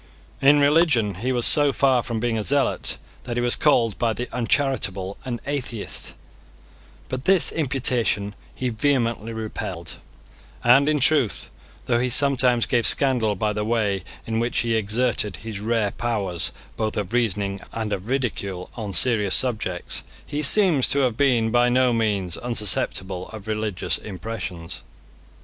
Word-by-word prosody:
In 145 +2 +5
religion 145 - +3
he 130 +2 -1
was 120 -2 +2
so 145 -1 +5
far 135 -3 +2
from 115 -2 -4
being 120 0 -1
a 110 - -2
zealot 140 +4 0 0.3
that 120 -1 -4
he - - +1
was 120 0 +2
called 115 -8 +2
by 115 -2 +1
the 125 +3 -5
uncharitable 115 -6 0
an 120 -2 -4
atheist: 130 -6 -2 0.9
but 130 - -5
this 190 -2 +3
imputation 125 -8 -1 0.2
he 130 - -2
vehemently 115 -2 -1
repelled; 110 -1 -6 0.7
and 135 +5 +5
in 150 -1 +1
truth, 135 -4 +2 0.3
though 120 -1 +1
he 125 +1 0
sometimes 125 -2 +4
gave 120 -3 +2
scandal 120 -6 +2
by 105 +2 -1
the 105 0 -2
way 105 -4 -1 0.2
in 110 0 -2
which 120 +1 0
he 115 -1 -1
exerted 110 -2 0
his 110 +1 -7
rare 110 -1 0
powers 100 -7 -2 0.3
both 110 -1 -2
of 105 +1 -4
reasoning 100 -4 -1
and 110 -2 -3
of 95 +2 -5
ridicule 100 -9 -3
on 105 -4 -4
serious 105 -6 +4
subjects, 110 -8 0 0.2
he 145 +1 -3
seems 160 -3 +4
to - - +2
have 125 -4 +1
been 120 -4 +2
by 120 +1 +3
no 125 0 +2
means 100 -6 -1
unsusceptible 100 -5 0
of 110 -1 -10
religious 110 -3 -2
impressions. 95 -4 -7
115 Hz, 150 wpm, -23 LUFS, 105-130 Hz, 0.9 s, In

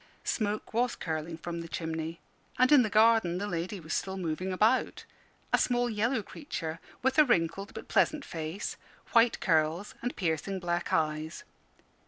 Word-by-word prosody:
Smoke 210 -1 -2
was 240 +2 +1
curling 160 0 -4
from 170 0 -5
the 165 - -7
chimney, 160 0 -4 0.4
and 255 +2 +4
in 290 -3 +8
the 220 - +1
garden 215 -4 +4
the 200 - -2
lady 185 +1 -3
was 160 -1 -5
still 190 0 -2
moving 180 +1 -2
about 215 +7 +2 0.5
a - - +5
small 245 -1 +1
yellow 220 +2 0
creature, 165 - -5 0.2
with 265 +2 +3
a - - +10
wrinkled 195 - 0
but - - -7
pleasant 305 -2 +2
face, 160 +3 -4 0.3
white 230 0 +4
curls, 165 +3 +1
and 245 - -3
piercing 175 +2 -1
black 175 -1 -2
eyes. 155 0 -1
185 Hz, 160 wpm, -30 LUFS, 165-230 Hz, 0.5 s, a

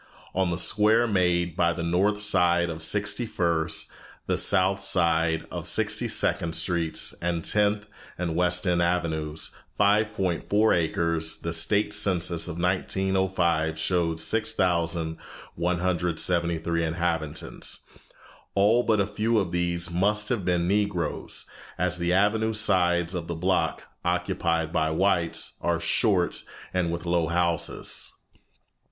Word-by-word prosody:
On 95 -1 0
the 85 - -2
square 105 +5 +3
made 90 -5 +1
by 85 -2 +2
the 85 - -5
north 100 +5 +1
side 85 -4 +2
of 80 0 -7
Sixty 105 +6 +1
first, 80 -4 -1 0.3
the - - 0
south 95 +2 +2
side 85 -4 +2
of - - -6
Sixty - - +1
second 85 -1 +1
Streets, 85 -3 0
and 85 -1 -2
Tenth 105 0 +1 0.3
and 85 -2 -3
West 90 +1 +2
End 90 -1 +1
Avenues, 80 -3 -2 0.2
5.4 105 0 +2
acres, 85 -1 0
the 85 - -5
state 100 +5 +2
census 90 -5 +2
of 85 - -6
1905 90 -3 0
showed 80 0 0
6173 85 -2 -1
inhabitants. 80 -2 -3 0.7
All 105 +5 +4
but 110 -3 +1
a 100 - +2
few 110 +3 -1
of 95 -5 0
these 85 0 -1
must 105 +4 +1
have 115 -6 -1
been 85 -1 0
Negroes, 100 -4 -1 0.3
as 90 0 -1
the 85 0 0
avenue 105 +4 +2
sides 90 -5 +2
of 85 -2 -4
the 85 - -4
block, 90 +3 0 0.2
occupied 90 -2 -1
by 80 0 +1
whites, 85 0 0
are - - 0
short - - +1 0.3
and 90 -2 0
with 85 +1 -5
low 85 -1 +1
houses. 85 -1 -2
90 Hz, 125 wpm, -25 LUFS, 85-95 Hz, 0.7 s, All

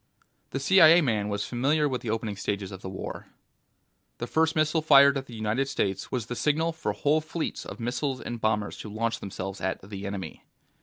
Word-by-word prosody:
The 135 - -3
CIA 165 +3 +7
man 110 -7 0
was 100 0 -2
familiar 145 +5 +1
with 130 -3 -2
the 115 - -5
opening 110 -1 -2
stages 100 0 -3
of 95 -1 -9
the 95 - -6
war. 95 - -7 0.9
The - - -4
first 160 0 +1
missile 155 +1 +2
fired 140 -2 +7
at 135 0 -4
the 120 - -10
United 110 +5 -1
States 95 -7 -2
was 120 -4 -2
the 120 - -5
signal 155 +5 +1
for 160 -10 -3
whole 145 +8 +2
fleets 160 +1 -4
of - - -8
missiles 125 +3 -2
and 120 -2 -6
bombers 105 -1 0
to 110 - -8
launch 115 +2 -2
themselves 95 0 -6
at 95 +1 -3
the 100 -1 -6
Enemy. 95 -5 -6
120 Hz, 200 wpm, -27 LUFS, 105-150 Hz, 0.9 s, CIA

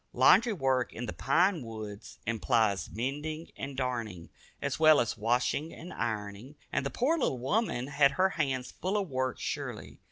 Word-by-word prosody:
Laundry 190 - +6
work 130 -7 +1
in 120 - -5
the - - -5
pine 170 +5 +2
woods 110 -2 -8
implies 110 -5 +1
mending 150 +7 -4
and 135 -1 -6
darning, 115 -9 -3 0.3
as - - -2
well 155 -2 +7
as 120 - 0
washing 125 +8 0
and 175 +3 -9
ironing, 110 +4 -4 0.2
and - - 0
the 140 - -1
poor 285 - +1
little 135 - 0
woman 135 - 0
had 140 0 +3
her 190 +1 +3
hands 135 -7 -2
full 190 +3 -2
of 200 -2 -1
work 130 -1 -1
surely. - - -5
130 Hz, 165 wpm, -30 LUFS, 115-155 Hz, 0.3 s, well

